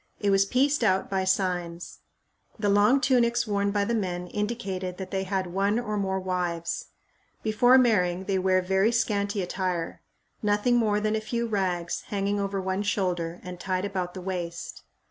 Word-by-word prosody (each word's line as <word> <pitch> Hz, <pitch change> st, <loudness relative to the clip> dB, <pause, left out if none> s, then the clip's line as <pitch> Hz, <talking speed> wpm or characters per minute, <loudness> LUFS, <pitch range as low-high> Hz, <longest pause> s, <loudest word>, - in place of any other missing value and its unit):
It 205 Hz, -1 st, +1 dB
was 195 Hz, 0 st, +4 dB
pieced 275 Hz, +4 st, +2 dB
out 190 Hz, -3 st, +2 dB
by 190 Hz, -1 st, 0 dB
signs. 180 Hz, -3 st, -1 dB, 0.6 s
The 210 Hz, -2 st, 0 dB
long 205 Hz, +7 st, +5 dB
tunics 240 Hz, -3 st, +3 dB
worn 200 Hz, -2 st, 0 dB
by 200 Hz, 0 st, +1 dB
the 235 Hz, -, -1 dB
men 180 Hz, -5 st, -2 dB
indicated 195 Hz, -4 st, -3 dB
that 190 Hz, -1 st, -7 dB
they 195 Hz, -1 st, -1 dB
had 190 Hz, 0 st, -1 dB
one 200 Hz, +3 st, +1 dB
or 235 Hz, -3 st, -2 dB
more 190 Hz, -2 st, -1 dB
wives. 180 Hz, -2 st, -2 dB, 0.6 s
Before 245 Hz, +4 st, +5 dB
marrying 190 Hz, -8 st, +3 dB
they 190 Hz, -1 st, 0 dB
wear 185 Hz, 0 st, +2 dB
very 190 Hz, +4 st, +2 dB
scanty 205 Hz, -4 st, 0 dB
attire 180 Hz, -2 st, -3 dB, 0.4 s
nothing 210 Hz, +3 st, +2 dB
more 210 Hz, -3 st, +2 dB
than 215 Hz, +1 st, 0 dB
a 220 Hz, -, -1 dB
few 235 Hz, +2 st, -2 dB
rags 185 Hz, -6 st, -1 dB
hanging 200 Hz, 0 st, -1 dB
over 195 Hz, 0 st, -1 dB
one 190 Hz, +1 st, -1 dB
shoulder 180 Hz, -4 st, -1 dB
and 180 Hz, -1 st, -8 dB
tied 185 Hz, +1 st, -1 dB
about 185 Hz, -2 st, -3 dB
the 185 Hz, -, -6 dB
waist. 175 Hz, -2 st, -5 dB
195 Hz, 170 wpm, -27 LUFS, 185-210 Hz, 0.6 s, long